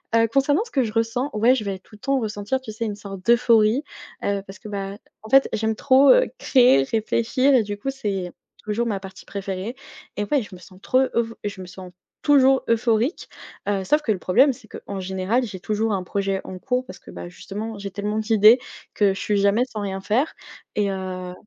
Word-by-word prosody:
heu, 230 0 +4
concernant 275 - +2
ce 460 - -15
que 265 - +2
je 220 - -3
ressens, 230 +5 0
ouais, 230 +4 +4
je 245 - -1
vais 200 -2 -3
tout 190 +3 -25
le - - -17
temps 275 +3 0
ressentir, 215 +2 -2
tu 225 -4 -8
sais, 230 +2 -4
une 210 -2 -3
sorte 195 -2 -9
d'euphorie, 235 +1 +4 0.4
heu, 200 -1 0
parce 195 0 -10
que, 210 - -10
bah, 200 -1 -5 0.2
en 220 - -11
fait, 270 0 +6
j'aime 220 0 0
trop, 270 +3 +5
heu, - - +4
créer, 245 - +5
réfléchir 235 - +1
et 250 - +5
du 205 -1 -5
coup, 270 +7 -3
c'est 195 -9 -3 0.3
toujours 220 +3 -1
ma 205 -3 -1
partie 190 0 -11
préférée 195 +3 -5 0.4
et 205 - 0
ouais, 280 +6 +1
je 205 -4 -10
me 180 - -13
sens 185 +1 -16
trop 255 - +1 0.2
euph 230 -1 0
je 200 -2 -5
me 185 - -8
sens 185 0 -10 0.3
toujours 270 -2 +5
euphorique, 230 - +1 0.4
heu, 195 -2 0
sauf 300 +10 +2
que 235 - 0
le 205 - 0
problème 255 +11 +4
c'est 235 -3 -13
qu'en 200 -1 -7
général 190 +6 -1
j'ai 195 -5 -6
toujours 215 +2 -1
un 190 - -1
projet 195 +1 -2
en 185 - -8
cours 250 +5 -1
parce 185 -7 -11
que, - - -14
bah, 175 - -8
justement, 210 +4 -7
j'ai 200 0 -6
tellement 205 +2 -3
d'idées 220 +1 +6 0.4
que 200 -2 +3
je 195 - -7
suis 205 -1 0
jamais 200 +4 +3
sans 215 -5 -6
rien 195 -1 -4
faire 250 +10 0 0.4
et 205 -1 0
heu, 185 -1 -5
215 Hz, 220 wpm, -23 LUFS, 195-245 Hz, 0.4 s, fait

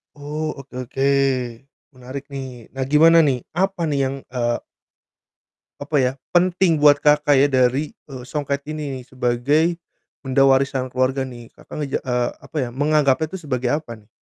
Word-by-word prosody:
Oh, 150 +2 -5
oke 135 -1 -13
oke, 135 +1 -6 0.9
menarik 130 +2 -8
nih. 130 -4 -8
Nah, 135 0 -2
gimana 165 +2 +6
nih, 130 - +1 0.2
apa 190 -1 0
nih 140 -2 0
yang, 135 +1 -2 0.2
eee 120 -2 0 1.2
apa 145 +1 -1
ya, 125 - +2 0.2
penting 175 -2 +3
buat 145 -1 +7
Kakak 150 -1 +3
ya 135 - +5
dari, 130 +3 +1 0.2
eee, 130 -3 -8
songket 140 +1 -3
ini 150 -3 -4
nih 125 - -10
sebagai 130 +4 +1 0.6
benda 130 +1 +2
warisan 135 -1 +2
keluarga 130 +1 0
nih. 120 -3 -8
Kakak - - -13
ngeja 145 -2 -2
eee, 125 -2 0
apa - - -9
ya, - - -6
menganggapnya 145 +1 +2
itu 185 -3 -8
sebagai 125 -3 -1
apa 150 -7 -8
nih? 105 - -28
135 Hz, 160 wpm, -21 LUFS, 130-150 Hz, 1.2 s, buat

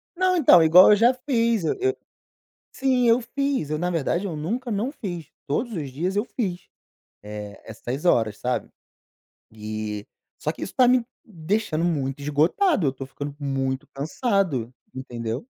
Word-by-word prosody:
Não, 370 +1 +2
então, 215 - +7
igual 175 +5 +8
eu 210 - +8
já 235 +4 +4
fiz, 235 -5 0
eu - - +1
eu 390 +1 0 0.8
sim, 255 -2 +2
eu 230 +2 +5
fiz, 265 - -2
eu 155 - -1
na 175 +2 -1
verdade, 170 +3 -1
eu 175 - -4
nunca 235 - -3
não 215 +5 -1
fiz, 175 - -6 0.2
todos 225 - -1
os 145 -5 -4
dias, 175 +9 -2
eu 210 - +2
fiz, 190 -9 -4 0.5
eh, 105 -1 -8
essas 120 +6 -6
horas, 115 -11 +2
sabe, 125 0 -2 0.8
e 105 -1 -5 0.4
só 155 - 0
que - - -13
isso - - -5
tá 255 -2 +5
me 250 -2 +4 0.2
deixando 175 -2 -2
muito 140 -5 -1
esgotado, 160 - +2
eu 130 - 0
tô 135 0 -7
ficando 145 +1 -7
muito 135 -2 -2
cansado, 150 - -1 0.2
entendeu? 120 - -5
170 Hz, 160 wpm, -24 LUFS, -, 0.8 s, igual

